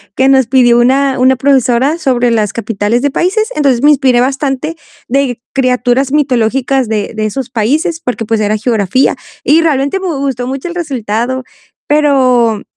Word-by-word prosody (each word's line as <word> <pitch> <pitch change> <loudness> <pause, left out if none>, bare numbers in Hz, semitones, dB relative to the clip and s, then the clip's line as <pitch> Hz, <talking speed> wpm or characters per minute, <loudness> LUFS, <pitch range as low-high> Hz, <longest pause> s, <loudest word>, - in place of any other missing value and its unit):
que 265 - +2
nos 265 -3 +3
pidió 245 -2 +4
una 265 +2 +2
una 260 +1 +4
profesora 265 +2 +1
sobre 250 -6 0
las 215 -3 0
capitales 225 +1 -1
de 285 - +1
países. 430 - 0
Entonces, 270 -5 +1
me 295 - +6
inspiré 260 -4 +2
bastante 270 +3 -2 0.3
de 260 -2 -1
criaturas 255 0 0
mitológicas 265 -2 0
de 215 -1 -3
de 215 0 -2
esos 245 +4 -4
países, 295 +9 -1
porque, 245 -5 -3
pues, 225 0 -1
era 210 0 0
geografía 220 +1 0 0.3
y 315 +3 +3
realmente 290 +2 0
me 380 - -4
gustó 270 -6 -3
mucho 270 +5 -5
el 345 - -7
resultado. 255 -5 -3 0.4
Pero, 255 -7 +2
260 Hz, 160 wpm, -12 LUFS, 235-280 Hz, 0.4 s, me